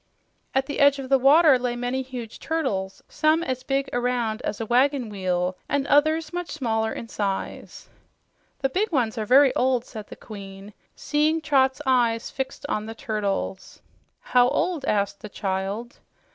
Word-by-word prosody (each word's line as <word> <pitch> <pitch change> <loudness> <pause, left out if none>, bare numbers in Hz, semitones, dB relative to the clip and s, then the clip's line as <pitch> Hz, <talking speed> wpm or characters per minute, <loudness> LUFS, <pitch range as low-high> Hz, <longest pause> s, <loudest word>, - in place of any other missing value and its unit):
At 265 0 +2
the 285 - -4
edge 280 0 +5
of 265 -2 -6
the 270 -1 +4
water 285 +1 +6
lay 245 -1 -2
many 245 +2 -2
huge 250 -4 -8
turtles, 205 -13 -2
some 315 +2 +2
as 260 -4 -3
big 275 +1 -1
around 245 -2 -1
as 205 - -4
a 225 - -2
wagon 255 +1 +2
wheel 185 -2 -1
and 285 -1 0
others 310 +3 +2
much 355 -1 -4
smaller 225 -6 -1
in 230 - -6
size. 200 -3 -4 0.7
"The 270 - +1
big 395 +9 -1
ones 240 -6 0
are 215 - -3
very 270 +2 +6
old," 250 -1 +1
said 215 -3 -9
the - - -10
Queen, 200 -1 -10 0.2
seeing 305 +2 +1
Trot's 280 -2 +2
eyes 240 -3 +2
fixed 270 +1 -5
on 215 -5 -2
the 225 - -7
turtles. 200 -3 -3 0.4
"How 245 -1 +4
old?" 330 -3 -1
asked 200 -3 0
the 210 - -8
child. 195 +4 -4
250 Hz, 165 wpm, -24 LUFS, 215-280 Hz, 0.7 s, water